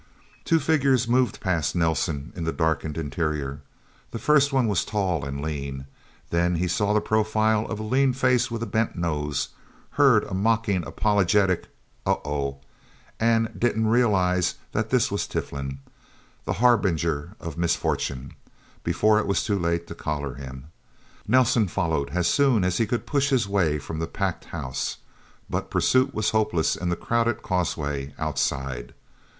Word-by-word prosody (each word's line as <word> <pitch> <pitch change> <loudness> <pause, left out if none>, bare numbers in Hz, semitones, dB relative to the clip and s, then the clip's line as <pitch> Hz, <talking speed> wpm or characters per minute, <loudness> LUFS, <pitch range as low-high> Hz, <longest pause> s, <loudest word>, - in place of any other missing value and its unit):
Two 165 - +3
figures 140 -5 +2
moved 125 +1 +2
past 85 -7 0
Nelsen 80 -3 0
in 85 - -4
the 80 - 0
darkened 80 -2 -1
interior. 75 -3 -2 0.5
The - - -5
first 145 +4 +3
one 130 -3 +2
was 100 -5 +1
tall 95 -7 -1
and 70 +1 -4
lean. 70 -3 -4 0.5
Then 85 +1 +2
he 90 +2 0
saw 100 +3 +1
the 105 - +4
profile 110 0 +1
of 110 - -4
a - - -4
lean 130 +4 +2
face 125 -1 +2
with 115 -1 -3
a - - -1
bent 110 -1 -1
nose, 75 -5 -2 0.4
heard 135 -6 +5
a 100 - -7
mockingly 100 -3 +1
apologetic 100 -2 +2 0.4
"Oh - - +1
oh..." 70 -2 -3 0.6
and 115 0 +3
didn't 115 -2 +1
quite 110 - +2
realize 95 -7 +2 0.2
that - - -1
this - - +2
was - - -1
Tiflin, 70 -1 -4 0.7
the - - -1
harbinger 90 -8 +1
of 85 -3 -6
misfortune, 70 -6 -1 0.5
before 110 0 +3
it 110 - -2
was 100 - +1
too 100 -2 0
late 85 0 0
to - - -8
collar 75 -4 -3
him. 65 +2 -9 0.6
Nelsen 120 -2 +4
followed 80 -5 -1
as 85 +3 0
soon 135 -8 +3
as 90 -1 0
he 115 - +2
could 120 +2 -2
push 140 -1 +1
his 125 -6 +2
way 90 -7 +1
from 80 +2 -6
the 80 - -2
packed - - -3
house. 65 0 -4 0.5
But - - -3
pursuit 130 +1 +3
was 110 -4 0
hopeless 95 -7 +1
in 90 - -3
the 85 - +1
crowded 120 +4 0
causeway 75 -6 -2
outside. 70 -4 -2
90 Hz, 160 wpm, -25 LUFS, 75-115 Hz, 0.7 s, heard